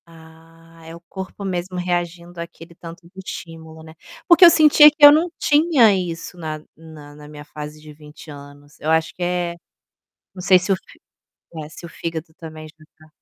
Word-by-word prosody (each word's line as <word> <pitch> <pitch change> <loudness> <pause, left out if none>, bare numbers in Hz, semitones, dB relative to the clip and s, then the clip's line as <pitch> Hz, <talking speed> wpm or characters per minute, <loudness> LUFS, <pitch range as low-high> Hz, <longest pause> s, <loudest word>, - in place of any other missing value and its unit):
Ah, 165 0 -19
é 165 +1 -10
o 170 - -14
corpo 190 +3 -9
mesmo 180 -1 -4
reagindo 175 -1 -4
aquele 170 0 -12
tanto 170 +1 -12
do - - -23
estímulo, 160 -3 -10
né. 160 0 -14 0.3
Porque 345 +1 +6
eu 345 - +11
sentia 305 -2 +7
que 300 0 +5
eu 290 - +11
não 320 +4 +2
tinha 295 -8 +3
isso 180 -2 -5
na 155 -2 -6 0.2
na 155 -2 -14
na 150 0 -14
minha 150 0 -12
fase 150 0 -10
de 150 0 -14
20 150 +1 -15
anos, 145 0 -15
eu 155 - -4
acho 160 0 0
que - - -15
é 175 -1 -2 0.8
não 185 - -10
sei 185 0 +5
se 185 +3 -3
o - - +3
fi 185 - -18 0.7
se 170 - -12
o - - -10
fígado 165 -1 -7
também 155 -1 -11
já 155 - -18
está 155 0 -23
165 Hz, 190 wpm, -20 LUFS, 155-180 Hz, 0.8 s, eu